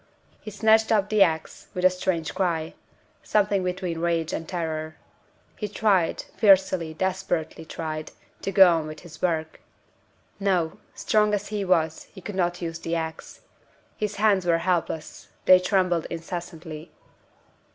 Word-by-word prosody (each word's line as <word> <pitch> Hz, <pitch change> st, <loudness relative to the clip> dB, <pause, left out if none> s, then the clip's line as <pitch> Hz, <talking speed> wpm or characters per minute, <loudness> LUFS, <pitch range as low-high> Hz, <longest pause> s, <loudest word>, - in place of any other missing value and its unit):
He -, -, -7 dB
snatched 220 Hz, +2 st, +3 dB
up 205 Hz, -2 st, +2 dB
the 215 Hz, -1 st, +2 dB
ax, 160 Hz, -4 st, +1 dB
with 180 Hz, 0 st, 0 dB
a 185 Hz, -, +7 dB
strange 180 Hz, -3 st, -2 dB
cry 170 Hz, -4 st, -1 dB, 0.5 s
something 200 Hz, -2 st, +1 dB
between 180 Hz, -2 st, -3 dB
rage 165 Hz, -1 st, 0 dB
and 165 Hz, -, -4 dB
terror. 160 Hz, -3 st, -3 dB, 0.6 s
He 210 Hz, -, -4 dB
tried 200 Hz, -4 st, +1 dB
fiercely, 190 Hz, -6 st, +3 dB
desperately 180 Hz, -3 st, -2 dB
tried 155 Hz, -1 st, -5 dB, 0.3 s
to 195 Hz, -, -2 dB
go 190 Hz, -3 st, +7 dB
on 155 Hz, -1 st, -3 dB
with 155 Hz, 0 st, -8 dB
his 155 Hz, -3 st, -13 dB
work. 160 Hz, -3 st, -1 dB, 0.8 s
No! 185 Hz, -5 st, 0 dB, 0.2 s
strong 210 Hz, -1 st, +2 dB
as 205 Hz, 0 st, -5 dB
he 210 Hz, -2 st, -2 dB
was, 165 Hz, -4 st, +1 dB
he 195 Hz, -, -12 dB
could 205 Hz, +3 st, -7 dB
not 175 Hz, -1 st, -1 dB
use 165 Hz, 0 st, -4 dB
the 165 Hz, 0 st, -2 dB
ax. 160 Hz, -1 st, -5 dB, 0.5 s
His 210 Hz, -1 st, -3 dB
hands 205 Hz, -2 st, +3 dB
were 170 Hz, -1 st, +3 dB
helpless; 170 Hz, -3 st, -2 dB, 0.2 s
they 185 Hz, 0 st, +8 dB
trembled 180 Hz, -3 st, +1 dB
incessantly. 165 Hz, -1 st, -7 dB
180 Hz, 145 wpm, -25 LUFS, 165-195 Hz, 0.8 s, they